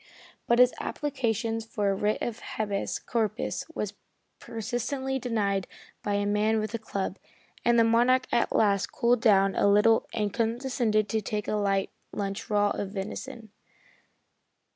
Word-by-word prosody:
But 235 Hz, -, +4 dB
his 250 Hz, 0 st, +6 dB
applications 230 Hz, -6 st, -2 dB
for 210 Hz, -3 st, -1 dB
a -, -, +1 dB
writ 210 Hz, +2 st, 0 dB
of 235 Hz, -1 st, -3 dB, 0.2 s
habeas 205 Hz, -2 st, -1 dB
corpus 220 Hz, -2 st, -2 dB
were -, -, -1 dB, 0.5 s
persistently 245 Hz, +4 st, -3 dB
denied 205 Hz, -6 st, -1 dB, 0.3 s
by 205 Hz, -, -1 dB
a 205 Hz, 0 st, 0 dB
man 210 Hz, +2 st, +2 dB
with 215 Hz, +1 st, -3 dB
a 230 Hz, -, -2 dB
club, 195 Hz, -3 st, -4 dB, 0.4 s
and 240 Hz, 0 st, +4 dB
the 230 Hz, -, +6 dB
Monarch 245 Hz, +3 st, +4 dB
at 235 Hz, -, +2 dB
last 200 Hz, -2 st, +2 dB
cooled 235 Hz, 0 st, +2 dB
down 195 Hz, -2 st, +4 dB
a -, -, +2 dB
little 210 Hz, +3 st, +4 dB
and 210 Hz, -3 st, -1 dB
condescended 230 Hz, -2 st, 0 dB
to 220 Hz, -, 0 dB
take 210 Hz, +1 st, -3 dB
a -, -, -1 dB
light 200 Hz, -2 st, +1 dB, 0.2 s
lunch 200 Hz, -1 st, -3 dB
of -, -, -22 dB
raw 205 Hz, -1 st, +3 dB
venison. 215 Hz, +4 st, -6 dB
220 Hz, 150 wpm, -28 LUFS, 205-235 Hz, 0.5 s, his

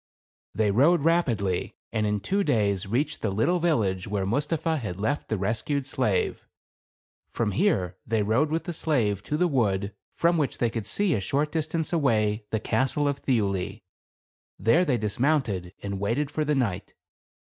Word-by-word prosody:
They 105 Hz, -2 st, +2 dB
rode 145 Hz, -, +4 dB
rapidly, 120 Hz, -, +1 dB, 0.2 s
and 110 Hz, -2 st, +1 dB
in 105 Hz, -1 st, -1 dB
two 200 Hz, -, 0 dB
days 100 Hz, -, +1 dB
reached 125 Hz, +9 st, -1 dB
the 110 Hz, -, 0 dB
little 115 Hz, -, +1 dB
village 105 Hz, -, +1 dB
where 100 Hz, -2 st, -1 dB
Mustapha 155 Hz, -, 0 dB
had 105 Hz, -8 st, -5 dB
left 140 Hz, +8 st, -1 dB
the 110 Hz, -, 0 dB
res 110 Hz, +4 st, -1 dB
cued 140 Hz, -1 st, -2 dB
slave. 125 Hz, -9 st, 0 dB, 0.9 s
From 110 Hz, -3 st, -1 dB
here 95 Hz, -, +1 dB
they 110 Hz, -1 st, 0 dB
rode 115 Hz, +9 st, +2 dB
with 160 Hz, +2 st, -1 dB
the 175 Hz, -, -4 dB
slave 115 Hz, -12 st, 0 dB
to 150 Hz, -, -1 dB
the 180 Hz, -, +3 dB
wood 105 Hz, -, 0 dB, 0.2 s
from 170 Hz, 0 st, +2 dB
which 145 Hz, -, -1 dB
they 120 Hz, -2 st, +1 dB
could 110 Hz, -2 st, -4 dB
see 205 Hz, -4 st, +1 dB
a 110 Hz, -, +1 dB
short 140 Hz, +10 st, 0 dB
dis 160 Hz, -2 st, -1 dB
tance 160 Hz, +1 st, -2 dB
away, 110 Hz, -8 st, +1 dB
the 110 Hz, -, -1 dB
castle 135 Hz, +6 st, 0 dB
of 140 Hz, -1 st, -1 dB
Thiuli. 100 Hz, -4 st, -1 dB, 0.7 s
There 135 Hz, -, +3 dB
they 135 Hz, -6 st, +2 dB
dis 105 Hz, 0 st, -3 dB
mounted 120 Hz, -, +1 dB
and 100 Hz, -1 st, -3 dB
waited 125 Hz, +9 st, -1 dB
for 155 Hz, -, -1 dB
the 150 Hz, 0 st, +1 dB
night. 105 Hz, -8 st, -2 dB
115 Hz, 180 wpm, -26 LUFS, 100-150 Hz, 0.9 s, rode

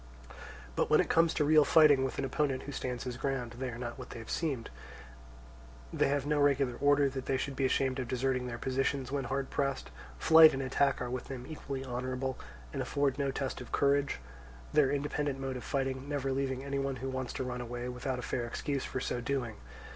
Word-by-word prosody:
But -, -, +1 dB
when -, -, +5 dB
it -, -, +2 dB
comes 165 Hz, 0 st, +4 dB
to 150 Hz, -, +2 dB
real 155 Hz, 0 st, +6 dB
fighting 145 Hz, -3 st, +6 dB
with 135 Hz, -, -2 dB
an 135 Hz, -, -1 dB
opponent 135 Hz, 0 st, 0 dB
who 145 Hz, -, -6 dB
stands 125 Hz, -3 st, -3 dB
his 125 Hz, -1 st, -4 dB
ground, 125 Hz, -3 st, -2 dB
they 130 Hz, -1 st, -2 dB
are 115 Hz, -, -6 dB
not 120 Hz, +1 st, -5 dB
what 125 Hz, -, -8 dB
they 115 Hz, -, -7 dB
seemed; 135 Hz, -, -2 dB, 1.2 s
they -, -, +2 dB
have 140 Hz, -1 st, 0 dB
no 150 Hz, 0 st, +1 dB
regular 140 Hz, -3 st, +3 dB
order 145 Hz, 0 st, +4 dB
that 130 Hz, -1 st, -5 dB
they 135 Hz, -, +2 dB
should 135 Hz, +1 st, -3 dB
be 135 Hz, -, +1 dB
ashamed 130 Hz, 0 st, +1 dB
of 125 Hz, -, -3 dB
deserting 130 Hz, 0 st, 0 dB
their 120 Hz, -1 st, -4 dB
positions 135 Hz, +1 st, -1 dB
when 140 Hz, -1 st, -1 dB
hard 135 Hz, +2 st, -2 dB
pressed; 140 Hz, -1 st, -1 dB, 0.3 s
flight 160 Hz, -1 st, +8 dB
and 135 Hz, -, -2 dB
attack 135 Hz, 0 st, +1 dB
are 125 Hz, -, -4 dB
with 130 Hz, -1 st, -3 dB
them 130 Hz, -2 st, -7 dB
equally 140 Hz, -4 st, -5 dB
honourable, 130 Hz, +1 st, -3 dB, 0.3 s
and -, -, -2 dB
afford 140 Hz, -1 st, 0 dB
no 140 Hz, -1 st, +1 dB
test 135 Hz, -1 st, -3 dB
of 125 Hz, -, -10 dB
courage; 140 Hz, -, +2 dB, 0.6 s
their 145 Hz, -3 st, +5 dB
independent 145 Hz, 0 st, -1 dB
mode 135 Hz, -1 st, -3 dB
of 125 Hz, -, -6 dB
fighting 135 Hz, +1 st, -2 dB
never 140 Hz, -2 st, -1 dB
leaving 135 Hz, -1 st, -1 dB
any 140 Hz, 0 st, -2 dB
one 135 Hz, -1 st, -1 dB
who 130 Hz, +1 st, -5 dB
wants 130 Hz, -1 st, -3 dB
to 130 Hz, -, -2 dB
run 125 Hz, -1 st, -4 dB
away 120 Hz, +1 st, -5 dB
without 125 Hz, +1 st, -3 dB
a 125 Hz, -, -5 dB
fair 120 Hz, -1 st, -2 dB
excuse 140 Hz, +3 st, -2 dB
for 130 Hz, -, -3 dB
so 125 Hz, -1 st, -2 dB
doing. 120 Hz, -3 st, -2 dB
135 Hz, 215 wpm, -32 LUFS, 125-140 Hz, 1.2 s, flight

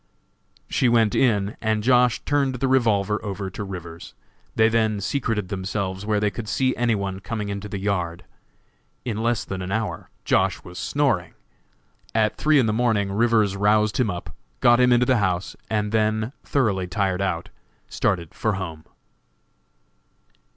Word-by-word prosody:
She 125 Hz, -, +2 dB
went 115 Hz, -3 st, +3 dB
in, 105 Hz, -5 st, +1 dB
and 110 Hz, -1 st, 0 dB
Josh. 125 Hz, 0 st, +4 dB
turned 140 Hz, -3 st, +1 dB
the 135 Hz, +2 st, -1 dB
revolver 110 Hz, -5 st, +2 dB
over 100 Hz, -2 st, -4 dB
to 105 Hz, -, -5 dB
Rivers. 85 Hz, -4 st, -8 dB, 0.4 s
They 110 Hz, -, +5 dB
then 110 Hz, -2 st, +1 dB
secreted 110 Hz, -3 st, -2 dB
themselves 95 Hz, 0 st, -3 dB
where 105 Hz, -1 st, +2 dB
they 105 Hz, 0 st, +1 dB
could 110 Hz, -1 st, -6 dB
see 130 Hz, 0 st, +1 dB
any 120 Hz, -2 st, +1 dB
one 95 Hz, -2 st, -3 dB
coming 105 Hz, 0 st, -4 dB
into 100 Hz, +1 st, -5 dB
the 100 Hz, -, -4 dB
yard. 90 Hz, -3 st, -2 dB, 0.8 s
In 115 Hz, -4 st, -2 dB
less 115 Hz, 0 st, 0 dB
than 95 Hz, -1 st, -5 dB
an 90 Hz, +1 st, -5 dB
hour 105 Hz, -5 st, -3 dB, 0.2 s
Josh. -, -, +1 dB
was 90 Hz, 0 st, -9 dB
snoring. 130 Hz, -12 st, 0 dB, 0.8 s
At 110 Hz, -1 st, +2 dB
three 155 Hz, 0 st, +3 dB
in 130 Hz, -, +4 dB
the 110 Hz, -, +1 dB
morning 110 Hz, -4 st, +1 dB
Rivers 110 Hz, -2 st, +2 dB
roused 105 Hz, +1 st, +2 dB
him 120 Hz, -4 st, +2 dB
up, 90 Hz, -2 st, -6 dB, 0.2 s
got 120 Hz, 0 st, +5 dB
him 125 Hz, 0 st, +5 dB
into 120 Hz, 0 st, +4 dB
the 130 Hz, 0 st, +3 dB
house, 95 Hz, -3 st, -1 dB
and 105 Hz, -1 st, -1 dB
then, 110 Hz, +2 st, 0 dB
thoroughly 105 Hz, -9 st, 0 dB
tired 95 Hz, +1 st, -1 dB
out, 90 Hz, -4 st, -2 dB, 0.4 s
started 85 Hz, -4 st, -1 dB
for 110 Hz, -2 st, -1 dB
home. 85 Hz, -5 st, -6 dB
105 Hz, 160 wpm, -23 LUFS, 95-115 Hz, 0.8 s, They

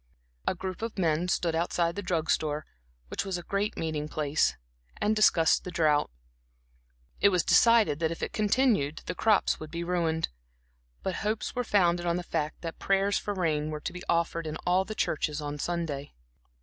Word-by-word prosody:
A -, -, +2 dB
group 185 Hz, +1 st, -5 dB
of 230 Hz, -2 st, -4 dB
men 165 Hz, -1 st, +1 dB
stood 175 Hz, -2 st, 0 dB
outside 170 Hz, +1 st, 0 dB
the 205 Hz, -, -3 dB
drug 170 Hz, -4 st, 0 dB
store, 150 Hz, -1 st, 0 dB, 0.4 s
which -, -, -2 dB
was 190 Hz, -2 st, -2 dB
a 175 Hz, -, -7 dB
great 200 Hz, +4 st, -2 dB
meeting 155 Hz, -2 st, -2 dB
place, 150 Hz, 0 st, +1 dB, 0.4 s
and 215 Hz, +1 st, +1 dB
discussed 175 Hz, -6 st, +4 dB
the -, -, -6 dB
drought. 155 Hz, -4 st, +2 dB, 1.1 s
It 200 Hz, -, +6 dB
was 180 Hz, -4 st, +2 dB
decided 225 Hz, -11 st, +5 dB
that 160 Hz, -1 st, +1 dB
if 165 Hz, -, -5 dB
it -, -, -3 dB
continued 210 Hz, -, +1 dB
the -, -, -3 dB
crops 215 Hz, +2 st, +2 dB
would 155 Hz, -, -7 dB
be 170 Hz, +1 st, -4 dB
ruined; 170 Hz, -2 st, 0 dB, 0.7 s
but 185 Hz, -2 st, -2 dB
hopes 215 Hz, +1 st, -2 dB
were 245 Hz, -, -1 dB
founded 175 Hz, -5 st, +2 dB
on 170 Hz, -, +2 dB
the 180 Hz, -, -2 dB
fact 155 Hz, -3 st, -3 dB
that 165 Hz, -1 st, -6 dB
prayers 195 Hz, +1 st, +2 dB
for 205 Hz, -, -4 dB
rain 155 Hz, -4 st, 0 dB
were 155 Hz, -1 st, -4 dB
to 175 Hz, -, -4 dB
be 180 Hz, -, -7 dB
offered 165 Hz, -1 st, 0 dB
in 155 Hz, +1 st, -4 dB
all 185 Hz, +2 st, +3 dB
the 215 Hz, -, -6 dB
churches 150 Hz, -5 st, -1 dB
on 145 Hz, 0 st, -5 dB
Sunday. 160 Hz, -4 st, -3 dB
170 Hz, 190 wpm, -28 LUFS, 155-195 Hz, 1.1 s, It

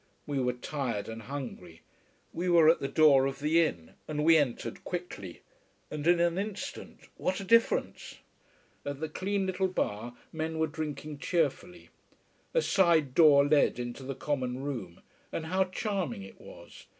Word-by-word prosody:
We 145 Hz, -2 st, -2 dB
were 125 Hz, -1 st, +1 dB
tired 125 Hz, -4 st, -3 dB
and 115 Hz, 0 st, -7 dB
hungry. 115 Hz, -, -7 dB, 0.5 s
We 180 Hz, +2 st, -2 dB
were 170 Hz, -3 st, +6 dB
at 165 Hz, -, +4 dB
the 135 Hz, -, -2 dB
door 140 Hz, -3 st, +5 dB
of 135 Hz, 0 st, -4 dB
the 155 Hz, +4 st, +3 dB
inn, 85 Hz, -, -4 dB, 0.2 s
and 150 Hz, -1 st, -2 dB
we 165 Hz, 0 st, +7 dB
entered 145 Hz, -6 st, -1 dB
quickly. 170 Hz, -, -6 dB, 0.5 s
And 150 Hz, +1 st, -3 dB
in 175 Hz, 0 st, +5 dB
an 170 Hz, +1 st, +2 dB
instant, 205 Hz, 0 st, -6 dB, 0.2 s
what 185 Hz, -, -1 dB
a -, -, -5 dB
difference! 230 Hz, -, +1 dB, 0.7 s
At 145 Hz, -1 st, -5 dB
the 160 Hz, -, -2 dB
clean 195 Hz, +5 st, -2 dB
little 190 Hz, 0 st, 0 dB
bar, 120 Hz, -, -3 dB, 0.2 s
men 160 Hz, 0 st, -3 dB
were 160 Hz, -, +2 dB
drinking 150 Hz, -1 st, -5 dB
cheerfully. 175 Hz, +2 st, -2 dB, 0.6 s
A -, -, +3 dB
side 165 Hz, -8 st, +3 dB
door 145 Hz, -2 st, +6 dB
led 145 Hz, -4 st, +3 dB
into 120 Hz, +2 st, -5 dB
the 135 Hz, +1 st, -5 dB
common 130 Hz, -2 st, -2 dB
room. 120 Hz, -12 st, -5 dB, 0.3 s
And 160 Hz, -, -4 dB
how 190 Hz, +3 st, +1 dB
charming 185 Hz, -, -3 dB
it 95 Hz, -, -13 dB
was. -, -, -13 dB
150 Hz, 160 wpm, -30 LUFS, 130-175 Hz, 0.7 s, we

